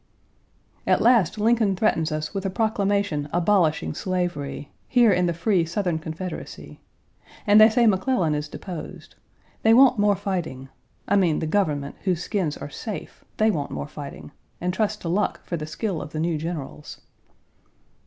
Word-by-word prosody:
At -, -, +4 dB
last 225 Hz, -6 st, +4 dB
Lincoln 220 Hz, -2 st, +2 dB
threatens 165 Hz, -5 st, +1 dB
us 155 Hz, +2 st, -3 dB
with 195 Hz, -1 st, -3 dB
a 195 Hz, -, -1 dB
proclamation 200 Hz, -7 st, 0 dB
abolishing 170 Hz, -, +2 dB
slavery1 175 Hz, -6 st, -3 dB, 0.2 s
here 240 Hz, -4 st, +5 dB
in 180 Hz, -1 st, +2 dB
the -, -, +1 dB
free 175 Hz, +1 st, +1 dB
Southern 170 Hz, 0 st, -1 dB
Confederacy; 160 Hz, +3 st, -7 dB, 0.7 s
and 210 Hz, 0 st, +7 dB
they 220 Hz, -, +9 dB
say 235 Hz, +2 st, +3 dB
McClellan 190 Hz, -5 st, +2 dB
is 150 Hz, 0 st, -3 dB
deposed. 175 Hz, -1 st, -8 dB, 0.5 s
They 225 Hz, +1 st, +5 dB
want 255 Hz, -2 st, +6 dB
more 205 Hz, 0 st, +4 dB
fighting 165 Hz, -9 st, -4 dB, 0.4 s
I 200 Hz, -, +3 dB
mean 175 Hz, -6 st, +3 dB
the -, -, -2 dB
government, 155 Hz, -6 st, -1 dB
whose 180 Hz, -3 st, 0 dB
skins 180 Hz, -8 st, -2 dB
are -, -, -7 dB
safe, 210 Hz, +8 st, -7 dB
they 215 Hz, 0 st, +4 dB
want 145 Hz, -7 st, -3 dB
more -, -, -5 dB
fighting, 145 Hz, -1 st, -9 dB, 0.3 s
and 180 Hz, +1 st, -1 dB
trust 210 Hz, +1 st, -1 dB
to -, -, -5 dB
luck 190 Hz, +5 st, -1 dB
for 175 Hz, -, -3 dB
the 155 Hz, -2 st, -5 dB
skill 190 Hz, +1 st, -3 dB
of -, -, -9 dB
the 155 Hz, -, -3 dB
new 165 Hz, -1 st, 0 dB
generals. 155 Hz, -2 st, -6 dB
180 Hz, 165 wpm, -24 LUFS, 155-210 Hz, 0.7 s, they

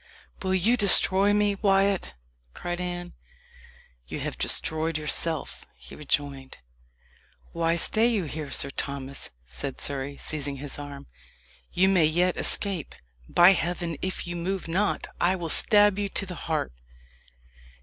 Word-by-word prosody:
"Will 190 Hz, 0 st, -1 dB
you 220 Hz, +7 st, +2 dB
destroy 200 Hz, -1 st, +6 dB
me, 205 Hz, 0 st, +1 dB
Wyat?" 195 Hz, -, 0 dB, 0.4 s
cried 175 Hz, 0 st, -5 dB
Anne. 175 Hz, 0 st, -6 dB, 0.9 s
"You -, -, -6 dB
have -, -, -5 dB
destroyed 160 Hz, 0 st, -1 dB
yourself," 155 Hz, +1 st, -1 dB
he -, -, -13 dB
rejoined. 140 Hz, -2 st, -4 dB, 0.9 s
"Why 165 Hz, 0 st, -1 dB
stay 220 Hz, +6 st, +3 dB
you 220 Hz, -6 st, -1 dB
here, 150 Hz, -1 st, -7 dB
Sir 140 Hz, -, -1 dB
Thomas?" 140 Hz, -1 st, -5 dB, 0.2 s
said -, -, -6 dB
Surrey, 140 Hz, 0 st, -3 dB
seizing 145 Hz, -2 st, -2 dB
his 140 Hz, +1 st, -8 dB
arm. 145 Hz, -1 st, -9 dB, 0.7 s
"You 190 Hz, +2 st, +2 dB
may 185 Hz, -4 st, +3 dB
yet 175 Hz, +4 st, +1 dB
escape. 195 Hz, -7 st, +4 dB, 0.3 s
By 175 Hz, +2 st, +6 dB
heaven! 175 Hz, -2 st, -2 dB
if 185 Hz, 0 st, -4 dB
you 175 Hz, 0 st, -6 dB
move 185 Hz, +2 st, -4 dB
not, 190 Hz, +5 st, -1 dB, 0.2 s
I 180 Hz, +2 st, +2 dB
will 170 Hz, -3 st, -6 dB
stab 205 Hz, +3 st, +5 dB
you 200 Hz, -1 st, -2 dB
to 195 Hz, -, 0 dB
the 185 Hz, -, -7 dB
heart!" 155 Hz, -, -4 dB
175 Hz, 140 wpm, -25 LUFS, 145-190 Hz, 0.9 s, destroy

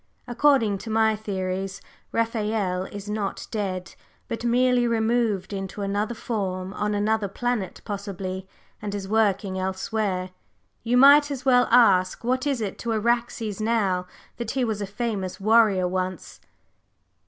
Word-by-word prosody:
"According 240 Hz, -5 st, +3 dB
to 220 Hz, -, -8 dB
my 220 Hz, 0 st, +3 dB
theories, 195 Hz, -2 st, -3 dB, 0.3 s
Raphael 215 Hz, -5 st, -1 dB
is 200 Hz, +1 st, -8 dB
not 210 Hz, -1 st, -3 dB
dead, 185 Hz, -5 st, -3 dB, 0.3 s
but 230 Hz, 0 st, -4 dB
merely 245 Hz, 0 st, +3 dB
removed 225 Hz, -3 st, 0 dB
into 195 Hz, +1 st, -4 dB
another 205 Hz, +4 st, -1 dB
form, 190 Hz, -5 st, -3 dB
on 210 Hz, 0 st, -1 dB
another 210 Hz, 0 st, +1 dB
planet 225 Hz, -1 st, -3 dB
possibly, 195 Hz, -2 st, -5 dB, 0.3 s
and 205 Hz, -1 st, -4 dB
is 195 Hz, -1 st, -5 dB
working 200 Hz, -3 st, +1 dB
elsewhere. 190 Hz, 0 st, -2 dB, 0.5 s
You 240 Hz, +2 st, +1 dB
might 285 Hz, +3 st, +7 dB
as 270 Hz, -2 st, -5 dB
well 250 Hz, -2 st, +5 dB
ask 200 Hz, -7 st, +4 dB
what 255 Hz, +3 st, 0 dB
it 275 Hz, -4 st, 0 dB
is 205 Hz, -3 st, -3 dB
to 235 Hz, -, -3 dB
Araxes 225 Hz, -2 st, -1 dB
now 200 Hz, -5 st, +1 dB, 0.3 s
that 235 Hz, -2 st, -4 dB
he 255 Hz, -, +2 dB
was 215 Hz, -3 st, -2 dB
a 200 Hz, -, -3 dB
famous 200 Hz, -3 st, -3 dB
warrior 210 Hz, -3 st, +4 dB
once?" 185 Hz, -1 st, -4 dB
210 Hz, 140 wpm, -25 LUFS, 190-235 Hz, 0.5 s, might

